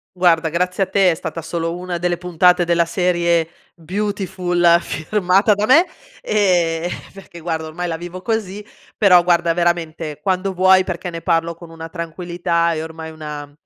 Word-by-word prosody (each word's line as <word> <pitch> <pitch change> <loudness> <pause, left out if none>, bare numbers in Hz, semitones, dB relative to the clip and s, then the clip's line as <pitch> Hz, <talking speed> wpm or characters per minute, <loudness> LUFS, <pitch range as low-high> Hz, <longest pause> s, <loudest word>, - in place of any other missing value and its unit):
Guarda 170 -3 +3
grazie 180 +3 0
a - - -3
te, 190 -3 +4
è - - +1
stata 165 0 -6
solo 165 +1 -3
una 180 -1 -4
delle 175 0 0
puntate 180 0 +3
della 170 0 +2
serie 170 -1 +1 0.3
Beautiful, 180 -2 +1
firmata 195 +4 +1
da 205 +1 -1
me, 325 +8 +6 0.4
ehm, 175 -5 +1 0.2
perché 185 -3 -12
guarda 160 -1 -3
ormai 175 +3 -4
la 165 -1 -3
vivo 175 +2 -8
così, 210 -3 -3 0.3
però 180 -4 +6
guarda 170 -1 +2
veramente, 165 -3 -2
quando 190 0 -1
vuoi, 185 +1 +5
perché 180 -1 -5
ne 165 0 -6
parlo 170 -1 0
con 170 0 -13
una 165 0 -8
tranquillità 170 0 -2
e 155 - -3
ormai 160 0 -8
una 150 -2 -8
175 Hz, 165 wpm, -19 LUFS, 165-185 Hz, 0.4 s, me